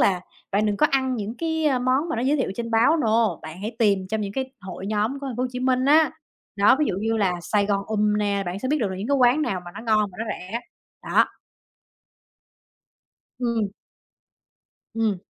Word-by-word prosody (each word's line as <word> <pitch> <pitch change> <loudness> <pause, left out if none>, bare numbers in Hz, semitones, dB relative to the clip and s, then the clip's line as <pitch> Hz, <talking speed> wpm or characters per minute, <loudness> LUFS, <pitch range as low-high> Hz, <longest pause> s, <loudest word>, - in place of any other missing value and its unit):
là 185 -3 +3 0.3
bạn 205 +2 +2
đừng 205 -1 0
có 300 - +4
ăn 260 -1 +1
những 215 +1 -4
cái 320 -1 0
món 255 +6 +1
mà - - -2
nó 230 - -1
giới 275 +4 +2
thiệu 260 - -1
trên 230 +1 -4
báo, 235 +8 +4
no, 225 - +2
bạn 160 +4 -9
hãy 220 +2 -5
tìm 200 -4 +2
trong 220 +1 -1
những 200 -1 -3
cái 265 +2 -3
hội 185 0 -7
nhóm 215 +6 0
của 280 - -5
Thành 250 - -5
phố 250 - -1
Hồ - - +1
Chí 250 - -4
Minh 255 0 +2
á. 305 +2 +5 0.5
Đó, 205 +6 +5
ví 305 - +3
dụ - - -1
như 225 +1 0
là 195 -4 +2
"Sài 200 +3 +1
Gòn 200 -1 0
Ùm" 210 -1 +1
nè, 200 -1 0
bạn 180 +2 -3
sẽ 255 +5 -3
biết 300 - +2
được 210 - +1
là 185 - -4
những 200 +5 -5
cái 280 - +3
quán 255 +3 +4
nào 190 -10 -1
mà 175 - -8
nó - - -7
ngon 215 -3 +1
mà 180 - -16
nó 225 - -2
rẻ, 210 +3 -4 0.4
đó. - - +3 2.1
Ừm. 235 -4 0 1.3
Ừm. 220 -3 +1
225 Hz, 225 wpm, -24 LUFS, 200-255 Hz, 2.1 s, á